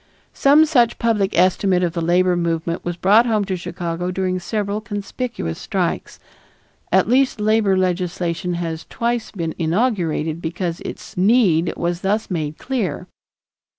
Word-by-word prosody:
Some 290 +3 +5
such 245 -7 +2
public 210 -6 0
estimate 185 0 +3
of 170 -2 0
the 170 - -2
labor 180 +2 +3
movement 170 0 -2
was 175 -1 -4
brought 210 +6 +4
home 215 -3 +1
to 190 -1 -2
Chicago 175 0 -4
during 185 0 -1
several 205 +2 -2
conspicuous 205 - -4
strikes; - - -2 0.7
at 190 0 +4
least 255 0 +2
labor 210 -2 +2
legislation 180 -1 -1
has 165 -2 -4
twice 235 -1 -2
been 165 -5 -4
inaugurated 165 -4 0
because 170 +1 -3
its - - -8
need 185 -5 +3
was 175 +1 -2
thus 205 +2 -1
made 155 -3 -3
clear. 210 - -3
185 Hz, 140 wpm, -20 LUFS, 170-215 Hz, 0.7 s, Some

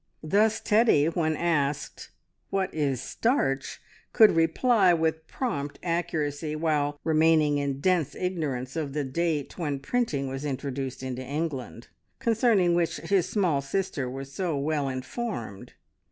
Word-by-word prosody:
Thus 210 +7 +2
Teddy, 215 -9 +4
when 160 -2 0
asked 145 -4 -1 0.4
"What 195 -1 -1
is 140 -5 0
starch?" 135 - -1 0.3
could 220 -3 +7
reply 180 +4 +3
with 160 0 -1
prompt 145 - -3
accuracy, 155 -3 -2
while 150 -2 0
remaining 155 -2 +3
in 140 -1 -2
dense 170 -4 +1
ignorance 150 -8 -3
of 150 -4 -3
the 150 0 -1
date 155 +3 -2
when 145 -4 -1
printing 140 - -1
was 135 +1 -5
introduced 135 -2 -4
into 130 -1 -4
England, 135 -3 -4 0.3
concerning 225 -7 +3
which 170 -1 +1
his 195 -3 0
small 175 -9 +1
sister 140 -2 -2
was 135 +1 -7
so 175 -4 -1
well 145 -1 0
informed. 130 - -5
155 Hz, 130 wpm, -27 LUFS, 140-175 Hz, 0.4 s, could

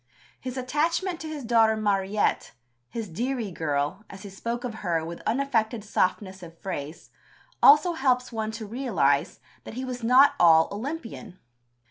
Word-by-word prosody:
His 255 0 -6
attachment 330 +7 -1
to 320 - -7
his 305 -3 -6
daughter 225 -2 +3
Mariette 205 -1 0 0.4
his 225 -2 -5
"dearie 230 +4 -3
girl," 150 +3 -2
as 195 +1 -11
he 200 - -9
spoke 235 +5 -4
of 245 -3 -4
her 165 -2 -1
with 170 +1 -7
unaffected 235 -4 0
softness 190 -1 -1
of 165 -1 -12
phrase 155 -5 -7 0.5
also 300 +5 +7
helps 255 -4 +1
one 220 -2 -3
to 225 -1 -6
realize 205 - 0 0.2
that - - -9
he 260 +1 -4
was 250 -1 -5
not 255 +5 +6
all 160 -2 +6
Olympian. 230 - -6
225 Hz, 150 wpm, -26 LUFS, 190-255 Hz, 0.5 s, also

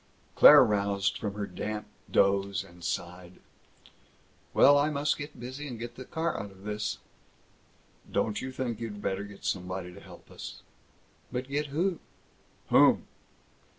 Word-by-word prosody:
Claire - - +9
roused 100 -1 +1
from 105 -2 -4
her 105 -1 -2
damp 105 +3 -5 0.2
doze 100 -1 +2
and 85 0 -16
sighed, 90 +1 -5 1.1
"Well, 145 - +7
I 145 +1 +3
must 145 0 +1
get 145 +1 -8
busy 130 +5 -6
and 125 -4 -6
get 120 +1 -6
the 130 +2 -9
car 165 +3 -2
out 100 - -7
of 95 0 -17
this." 105 0 -3 1.1
"Don't 105 -1 0
you 130 - -5
think 125 -4 -3
you'd 110 -3 -5
better 100 -1 -2
get 100 -1 -11
somebody 90 -1 -3
to 100 - -11
help - - -14
us?" - - -9 0.7
"But 125 +1 -4
get 145 +2 -1
who?" 170 +5 0 0.7
"Whom!" - - +5
105 Hz, 150 wpm, -29 LUFS, 100-130 Hz, 1.1 s, Claire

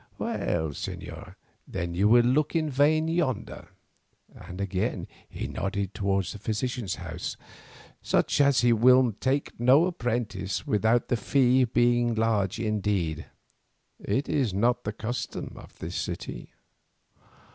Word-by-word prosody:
Well, 80 -2 -1
señor, 70 - -7 0.3
then 85 -2 -4
you 95 +4 +2
will 120 +2 +6
look 145 +6 +1
in 155 -2 +1
vain 155 +4 +3
yonder," 160 -9 -2 0.7
and 90 +2 -10
again 95 -2 -2 0.2
he - - -5
nodded 100 0 -3
towards 95 -1 -1
the 105 - -9
physician's 110 0 -2
house. - - -6 0.6
"Such - - +1
as 140 -3 +4
he 120 -1 +4
will 125 +2 +5
take 135 -1 -1
no 130 +7 +5
apprentice 115 - -2
without 110 +3 +2
the 120 - +2
fee 130 +3 +3
be 120 +1 +2
large 110 -4 0
indeed; 100 -8 -1 0.7
it 120 +8 -1
is 125 -10 0
not 120 +5 +1
the 105 - -1
custom 115 +3 -5
of - - -14
this - - -5
city." - - -5
115 Hz, 130 wpm, -27 LUFS, 100-130 Hz, 0.7 s, will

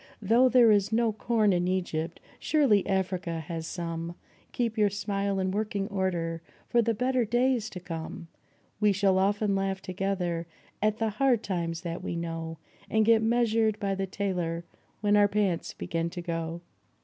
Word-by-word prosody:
Though 230 +5 +4
there 245 -3 +6
is 205 0 +3
no 225 0 +2
corn 215 -2 +2
in 175 0 +1
Egypt, 170 -3 -2 0.2
surely 270 -11 +3
Africa 185 -3 -1
has 160 +1 -5
some 170 -1 -4 0.4
Keep 235 -2 -1
your 210 -2 +3
smile 200 -1 -1
in 190 0 0
working 205 -1 -1
order 175 -4 -1 0.3
for 240 - +3
the 230 0 0
better 250 +2 +1
days 240 0 +1
to 180 - -7
come! 165 -1 -6 0.5
We 210 -1 +4
shall 190 -1 +3
often 205 +1 +2
laugh 195 0 -1
together 185 -3 -2 0.3
at 215 +1 +2
the 225 -1 0
hard 245 +1 +2
times 170 -3 -2
that 170 -2 -5
we - - -3
know, 165 -1 -4 0.3
And 220 0 +3
get 225 0 +5
measured 225 -2 +2
by 200 -2 -1
the 195 0 -2
tailor 180 -4 -2 0.4
when 205 -1 +3
our 205 0 +6
pants 200 -4 0
begin 165 0 -2
to 175 +1 -6
go. 165 0 -3
195 Hz, 165 wpm, -28 LUFS, 170-220 Hz, 0.5 s, there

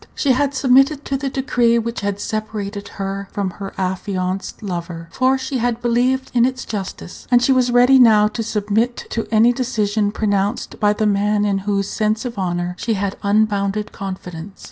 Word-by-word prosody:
She 280 - +2
had 280 +2 +1
submitted 270 +3 +3
to 275 - -2
the 270 0 -2
decree 245 -3 +2
which 230 -1 -3
had 200 0 -2
separated 205 -1 -4
her 195 0 -4
from 200 -2 -2
her 195 +2 -7
affianced 185 +1 -3
lover, 170 -3 -5
for 260 +6 +2
she 265 0 -3
had 235 0 0
believed 250 +2 +1
in 240 -1 +4
its 255 +1 -1
justice; 195 -3 -7
and 245 -1 +6
she 245 +3 +2
was 255 -1 +3
ready 245 +2 +5
now 215 -4 +6
to 225 - -4
submit 220 +2 -1
to 225 - -2
any 230 +2 +5
decision 215 -5 0
pronounced 205 -1 -1
by 210 0 +3
the 215 +1 -1
man 205 0 +2
in 200 -1 +1
whose 200 -1 0
sense 215 +2 -1
of 235 -4 -5
honor 175 -1 -2
she 225 -1 -1
had 200 0 -2
unbounded 205 0 +1
confidence. 185 -1 -7
215 Hz, 180 wpm, -19 LUFS, 200-245 Hz, -, and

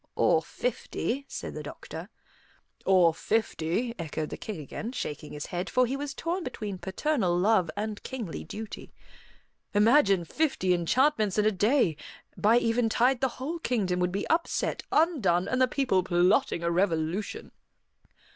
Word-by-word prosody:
"Or - - +3
fifty," 280 - -3
said - - -6
the - - -5
doctor. - - -8 0.8
"Or 180 -4 +5
fifty," 220 +3 -1
echoed 155 -1 -3
the - - -3
King 210 -6 -6
again, 215 - -6
shaking 150 - -5
his 150 0 -5
head, 180 +1 -4
for 255 0 +3
he 255 +3 -2
was 280 0 -5
torn 345 +4 -2
between 205 - -5
paternal 190 - 0
love 190 -2 +3
and 210 0 -3
kingly 235 -10 -5
duty. 215 0 -8 0.8
"Imagine 205 - +4
fifty 225 - +1
enchantments 215 - +2
in 210 - +3
a 215 - +4
day! 210 - +2 0.4
By 220 +3 +4
eventide 240 +2 +2
the 265 - +3
whole 315 +6 -4
kingdom 200 - 0
would 180 0 +1
be 200 +2 -2
upset, 335 +1 0
undone, 230 - +2
and 255 0 0
the 255 - +5
people 255 -8 +1
plotting 180 +2 +2
a 170 - +1
revolution." 170 +1 -1
210 Hz, 145 wpm, -28 LUFS, 180-255 Hz, 0.8 s, Or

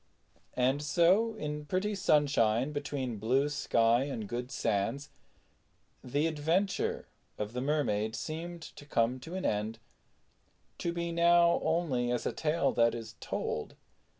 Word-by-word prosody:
And 130 +3 +2
so, 175 +10 +3
in 150 -4 -4
pretty 190 +5 0
sunshine, 140 - +2
between 140 -5 -3
blue 130 +7 +2
sky 120 -3 +2
and 115 -7 -4
good 120 +3 -4
sands, 115 +5 -1 0.9
the 145 +5 0
adventure 165 +5 0 0.3
of 105 +1 -4
the 125 - -2
Mermaid 115 -7 0
seemed 165 +8 -5
to 145 - -12
come 120 -1 +1
to 165 +8 -8
an 190 - -3
end, 105 +2 -1 1.0
to 170 - -1
be 170 0 -3
now 170 0 +4
only 160 -7 0
as 120 - -1
a - - -1
tale 160 +2 +1
that 115 0 +3
is 115 -1 -7
told. - - -4
145 Hz, 135 wpm, -31 LUFS, 120-165 Hz, 1.0 s, now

